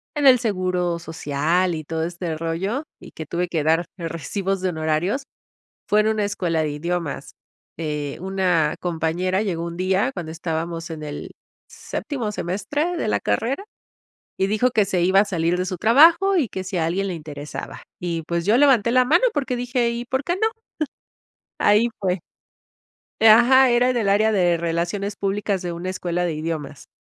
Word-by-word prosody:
en 295 -1 0
el 255 -3 +8
seguro 185 -5 -1
social 165 +2 0
y 155 - -5
todo 160 +1 -3
este 170 -1 -3
rollo 165 - -2 0.2
y - - -13
que 160 - -8
tuve 175 +3 -1
que 165 -3 -1
dar, 165 +3 +2
eh, 165 - -3
recibos 195 +4 -3
de 185 - 0
honorarios. 160 - -1 0.7
Fue 210 - +4
en 215 - +1
una 215 -1 +1
escuela 175 -5 -1
de 155 - -1
idiomas, 165 0 -3 0.5
eh, 150 -3 -3
una 180 -5 +1
compañera 175 +3 -1
llegó 170 -5 -2
un 170 0 -6
día 190 +7 +1
cuando 165 -4 -5
estábamos 165 +1 -4
en 155 -1 -6
el 145 -1 -6 0.4
séptimo 240 -8 -4
semestre 210 - -2
de 320 - -2
la - - +1
carrera 270 - -1 0.7
y 190 - +1
dijo: 215 +5 +2
"Que 215 -4 +3
se 190 -3 0
iba 190 +2 +5
a 205 - +4
salir 175 -3 0
de 180 - -1
su 185 -1 -4
trabajo 330 - +5
y 295 -8 +2
que 190 - -5
si 190 -1 -4
a 160 - +1
alguien 190 +4 -1
le 185 - -3
interesaba", 150 -2 -8 0.2
y 170 -2 -3
pues 170 +1 -2
yo 215 +4 +4
levanté 255 -5 +4
la 255 +1 +4
mano 340 - +4
porque 265 -3 -1
dije: 245 0 0
"¿Y 235 +1 -4
por 260 +2 -2
qué 345 - 0
no? 440 +3 +2 1.1
Ahí 210 +3 +4
fue. 185 -2 0 1.0
Eh, 225 - +7
ajá, 250 +3 +7
era 245 +1 +3
en 255 - +1
el 215 -4 +1
área 215 +2 +4
de 175 -5 +2
relaciones 175 +5 -2
públicas 200 -1 -1
de 175 -1 -3
una 170 +2 -5
escuela 180 -1 -2
de 165 - -2
idiomas. 155 -3 -5
185 Hz, 185 wpm, -22 LUFS, 165-220 Hz, 1.1 s, el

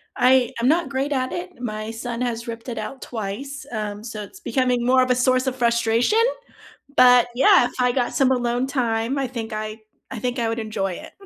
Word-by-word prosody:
I 255 0 +4
I'm 240 - +1
not 320 -1 +2
great 275 +2 -2
at 255 -2 -1
it. 360 +1 -4
My 215 -2 -4
son 235 +1 -5
has 235 -1 -2
ripped 230 +2 -6
it 230 - -5
out 260 +5 -6
twice, 245 +6 -6
um, 210 -1 -4
so 220 -2 -6
it's 390 - -13
becoming 250 -7 0
more 255 +1 +5
of 255 - +1
a 250 - +4
source 255 +1 +2
of 260 - -1
frustration, 235 - +2 0.8
but 250 -1 +7
yeah, 365 +3 +6
if - - -7
I 250 0 +3
got 245 -2 -1
some 265 -1 +3
alone 245 +1 0
time, 240 -1 -1
I 270 - 0
think 230 -3 -6
I 215 0 -4 0.3
I - - -5
think 245 +2 -2
I 230 -1 0
would 230 +1 -2
enjoy 210 -4 -2
it. - - -9
245 Hz, 215 wpm, -22 LUFS, 225-260 Hz, 0.8 s, but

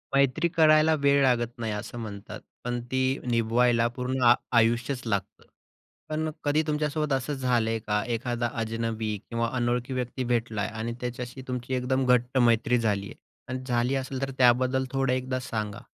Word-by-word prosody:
मैत्री 140 +5 +3
करायला 155 -1 +5
वेळ 140 0 +4
लागत 120 -2 +2
नाही, 115 -2 -2
असं 105 +3 -6
म्हणतात, 100 -3 -7 0.2
पण 120 0 -2
ती 130 +1 +1
निभवायला 115 0 +3
पूर्ण 130 +1 -2
आ 120 - +9 0.2
आयुष्यच 120 +3 +2
लागतं. 100 -4 -3 0.7
पण 155 +1 -1
कधी 150 +2 +2
तुमच्यासोबत 150 0 -1
असं 135 +2 -1
झालंय 120 -4 +1
का? 105 -1 -1
एखादा 120 0 -1
अजनबी 110 -1 -2
किंवा 115 0 -1
अनोळखी 125 +1 0
व्यक्ती 125 0 -3
भेटलाय 110 -3 -1
आणि 110 +2 -4
त्याच्याशी 125 +1 -5
तुमची 125 0 -4
एकदम 130 +1 0
घट्ट 125 +2 +1
मैत्री 120 0 +3
झाली 105 -3 0
आहे? - - -11 0.3
आणि 130 +1 -4
झाली 125 +1 +1
असेल 135 0 -3
तर 135 0 -2
त्याबद्दल 130 +1 +3
थोडं 135 -1 +1
एकदा 130 0 -2
सांगा. 110 -5 -4
125 Hz, 160 wpm, -27 LUFS, 115-130 Hz, 0.7 s, आ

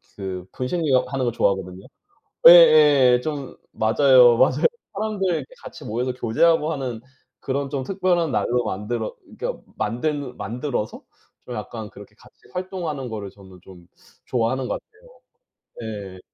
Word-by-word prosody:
그 95 -2 -6
분식류 130 -2 0
하는 130 0 -2
거 120 - 0
좋아하거든요. 95 -3 -1 0.6
예예 150 -7 +7
좀 145 -3 -5 0.2
맞아요, 120 +1 +5
맞아요. 130 +4 +3 0.3
사람들 200 -4 -1
이제 - - -9 0.2
같이 160 -4 -10
모여서 125 +3 -2
교제하고 155 +7 +2
하는 130 -6 -4 0.4
그런 140 0 -3
좀 140 -2 -3
특별한 180 -1 0
날로 125 -1 0
만들어 110 +3 -4 0.2
그러니까 - - -4 0.2
만든 135 +4 -3
만들어서 120 -2 -4 0.4
좀 - - -7
약간 110 -3 -7
그렇게 100 0 -14
같이 - - -20 0.2
활동하는 175 -8 -4
거를 105 -3 -6
저는 95 -2 -16
좀 90 -3 -15 0.4
좋아하는 125 +1 -1
것 - - -3
같아요. 485 +4 -23 0.7
네. 100 -5 -7
130 Hz, 310 characters per minute, -22 LUFS, 110-155 Hz, 0.7 s, 예예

